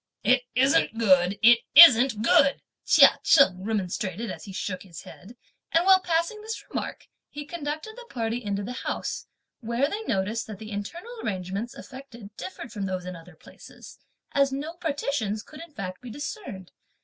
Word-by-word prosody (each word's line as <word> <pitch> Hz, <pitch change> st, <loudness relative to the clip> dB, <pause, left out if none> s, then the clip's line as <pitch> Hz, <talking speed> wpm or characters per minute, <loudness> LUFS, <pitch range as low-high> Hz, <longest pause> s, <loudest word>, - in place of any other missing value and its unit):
"It 255 Hz, 0 st, +3 dB
isn't 270 Hz, -1 st, +2 dB
good! 190 Hz, -3 st, +3 dB
it 235 Hz, +1 st, +7 dB, 0.2 s
isn't 255 Hz, -7 st, +8 dB
good!" 275 Hz, +4 st, +3 dB, 0.2 s
Chia -, -, +6 dB
Cheng 185 Hz, -9 st, +4 dB
remonstrated 205 Hz, 0 st, -3 dB
as -, -, -9 dB
he 200 Hz, -, -9 dB
shook 185 Hz, -1 st, -4 dB
his 175 Hz, -4 st, -11 dB
head; 205 Hz, +7 st, -13 dB, 0.4 s
and 335 Hz, +2 st, +2 dB
while 380 Hz, 0 st, +7 dB
passing 345 Hz, +4 st, -1 dB
this 445 Hz, +1 st, -6 dB
remark, -, -, -5 dB, 0.2 s
he 295 Hz, 0 st, -8 dB
conducted 310 Hz, +6 st, -6 dB
the -, -, -12 dB
party 235 Hz, 0 st, -3 dB
into 200 Hz, -1 st, -3 dB
the 240 Hz, +5 st, -6 dB
house, 250 Hz, -, -5 dB, 0.3 s
where 235 Hz, +3 st, -1 dB
they 410 Hz, +8 st, -4 dB
noticed 210 Hz, +4 st, -2 dB
that 215 Hz, -2 st, -8 dB
the 215 Hz, +2 st, -10 dB
internal 335 Hz, -, -6 dB
arrangements 195 Hz, +3 st, -4 dB
effected 235 Hz, -6 st, -12 dB
differed 190 Hz, +5 st, -8 dB
from 205 Hz, -4 st, -4 dB
those 185 Hz, -1 st, -4 dB
in 180 Hz, 0 st, -6 dB
other 165 Hz, +1 st, -14 dB
places, -, -, -15 dB, 0.3 s
as 275 Hz, -1 st, +2 dB
no 290 Hz, +5 st, -5 dB
partitions 280 Hz, -, -3 dB
could, 305 Hz, +1 st, -13 dB
in 335 Hz, -1 st, -11 dB
fact, 185 Hz, -8 st, -7 dB
be 250 Hz, -, -9 dB
discerned. 230 Hz, -, -7 dB
235 Hz, 170 wpm, -26 LUFS, 200-290 Hz, 0.4 s, isn't